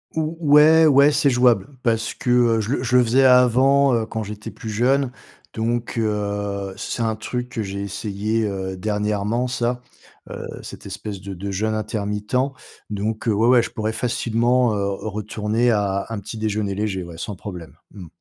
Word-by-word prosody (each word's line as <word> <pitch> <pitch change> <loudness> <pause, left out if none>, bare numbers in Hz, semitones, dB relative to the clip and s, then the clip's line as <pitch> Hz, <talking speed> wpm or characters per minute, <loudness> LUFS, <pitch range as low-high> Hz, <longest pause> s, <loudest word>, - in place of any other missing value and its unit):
Ou 160 +1 -2
ouais 155 +1 +6
ouais, 140 -1 +6
c'est 145 -1 +3
jouable. 125 -5 +3
Parce 115 -2 0
que, - - -5
heu, 120 -2 +4
je 110 +3 -3
le 130 - -1
je 125 0 0
le 125 - +6
faisais 125 +3 +3
avant, 130 +2 +5
heu, 115 -1 0
quand 110 0 -4
j'étais 105 0 -7
plus 110 - -8
jeune. 125 +5 +1 0.4
Donc, 115 +2 -2
heu, 100 -2 -2
c - - -6
c'est - - -2
un 110 -1 0
truc 125 +3 -4
que 115 -3 -3
j'ai 100 0 -5
essayé, 105 +2 -2
heu, 95 -2 -4
dernièrement, 105 +4 -1
ça. 125 0 -1 0.5
Heu, - - -6
cette - - -10
espèce 100 -3 -6
de 95 +1 -7
de 100 +2 -5
jeûne 110 +3 -1
intermittent. 105 +1 -2 0.5
Donc, 105 +3 -3
heu, 110 - +3
ouais, 110 +3 +2
ouais, 125 -1 +6
je - - -5
pourrais 110 -1 -2
facilement, 120 0 +1
heu, 100 -1 -1
retourner 105 +3 -1
à 100 -2 0
un 115 -2 -4
petit-déjeuner 105 -1 -3
léger, 100 -2 -2
ouais, 85 -1 -10
sans 105 +4 -5
problème. 90 -6 -9 0.2
Mmh. 95 -5 -10
110 Hz, 180 wpm, -22 LUFS, 100-125 Hz, 0.5 s, ouais